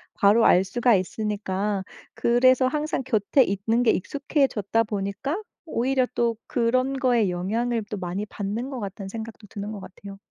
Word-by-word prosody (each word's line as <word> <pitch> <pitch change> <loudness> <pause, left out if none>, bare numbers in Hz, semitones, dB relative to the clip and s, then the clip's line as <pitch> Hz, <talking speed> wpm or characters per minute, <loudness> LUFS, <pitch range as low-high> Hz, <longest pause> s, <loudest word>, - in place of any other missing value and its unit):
바로 210 +3 +5
알 185 +2 +5
수가 240 +3 +3
있으니까 200 0 -2 0.3
그래서 255 +2 +4
항상 300 -1 -1
곁에 245 +2 +3
있는 220 +5 0
게 230 - +5
익숙해졌다 250 - 0
보니까 210 - -3 0.2
오히려 260 -2 +1
또 235 -1 +1
그런 255 +3 +1
거에 240 -6 +3
영향을 220 +6 -1
또 210 - -3
많이 185 +2 -3
받는 215 +5 -4
것 260 -5 -5
같다는 195 0 -6
생각도 220 0 -8
드는 205 +2 -6
것 205 - -6
같아요. 195 +1 -11
225 Hz, 325 characters per minute, -25 LUFS, 200-250 Hz, 0.3 s, 바로